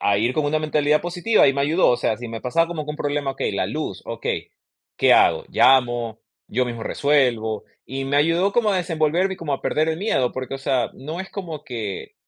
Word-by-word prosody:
a 100 0 +2
ir 120 +4 +1
con 155 - 0
una 155 +2 +1
mentalidad 150 -1 +1
positiva. 175 +2 +2
Y - - +3
me 140 - -1
ayudó, 160 +6 +3
o 120 - +3
sea, 110 - 0
si 120 +1 -7
me 115 0 -6
pasaba 165 +7 +1
como 160 -3 -4
que 150 - -5
un 150 - -5
problema, 145 -1 -1
okey, - - -2
la - - -1
luz, - - -4
okey, - - -4 0.4
¿qué - - +5
hago? - - +4
¿Llamo? 120 -4 +3 0.3
¿Yo 125 +3 0
mismo 120 -2 -5
resuelvo? 120 -6 +1 0.2
Y 135 +1 -5
me 140 +1 0
ayudó 165 +6 +2
como 225 -2 +2
a 195 - +1
desenvolverme 175 +2 0
y - - -17
como 160 -5 -4
a 135 - -2
perder 155 +1 +1
el 160 0 -1
miedo, 135 - 0
porque, 130 +1 -5
o - - -5
sea, 130 -2 0
no 155 +6 -6
es 190 - -8
como 165 -7 -6
que, 110 -6 -6
145 Hz, 230 wpm, -22 LUFS, 125-165 Hz, 0.4 s, qué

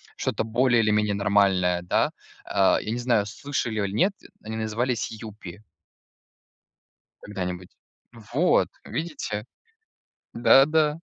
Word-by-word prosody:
что-то - - -2
более 120 +1 +2
или 110 - +1
менее 105 -1 +2
нормальное, 100 -3 +2
да? 90 - +1 0.3
А, - - +2
я 110 - -6
не 120 - -2
знаю, 120 -4 +1
слышали 120 -1 -3
аль 100 -1 -2
нет, 185 - +3 0.3
они 110 0 -6
назывались 110 +3 -2
"Юпи". 105 -4 -10 1.6
Когда-нибудь. 90 -3 -5 0.6
Вот, 170 +7 +3 0.2
видите. 135 -10 -4 0.9
Да 135 +3 +6
да. 155 0 +1
110 Hz, 115 wpm, -25 LUFS, 100-125 Hz, 1.6 s, Да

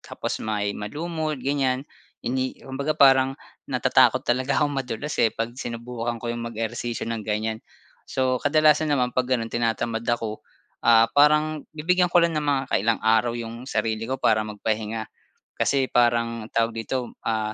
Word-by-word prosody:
tapos - - -5
may 105 -2 -1
malumot, 155 +7 -3
ganyan. 135 -1 0 0.4
Hindi 130 +1 -1
kumbaga 140 +3 -2
parang 135 -1 +5 0.3
natatakot - - +3
talaga 130 +3 +1
akong 145 - +1
madulas, 135 +2 -4
eh, 115 - +5
'pag 115 +1 -3
sinubukan 120 0 -4
ko 120 0 -2
yung 120 - -5
mag-ehersisyo 115 +1 -4
ng 115 -2 -3
ganyan. 110 +1 -1 0.5
So, 130 -1 0
kadalasan 155 0 +4
naman 125 -2 +1
'pag 130 -1 0
gano'n, 115 -3 0
tinatamad 115 0 -1
ako, 115 -2 -1 0.5
ah, 115 -1 +6
parang 150 +1 +3
bibigyan 180 +3 +2
ko 175 0 +4
lang 170 0 +2
ng 150 - -2
mga 140 -2 +2
kailang 110 +4 +2
araw 115 +2 +3
yung 115 +1 -7
sarili 110 +1 -1
ko 130 - -1
para 110 -4 +2
magpahinga 110 +1 -3 0.5
kasi 135 -1 +1
parang 115 -2 +1
tawag 115 0 +1
dito, 125 0 -3
ah, 110 -1 -1
120 Hz, 155 wpm, -24 LUFS, 115-140 Hz, 0.5 s, ah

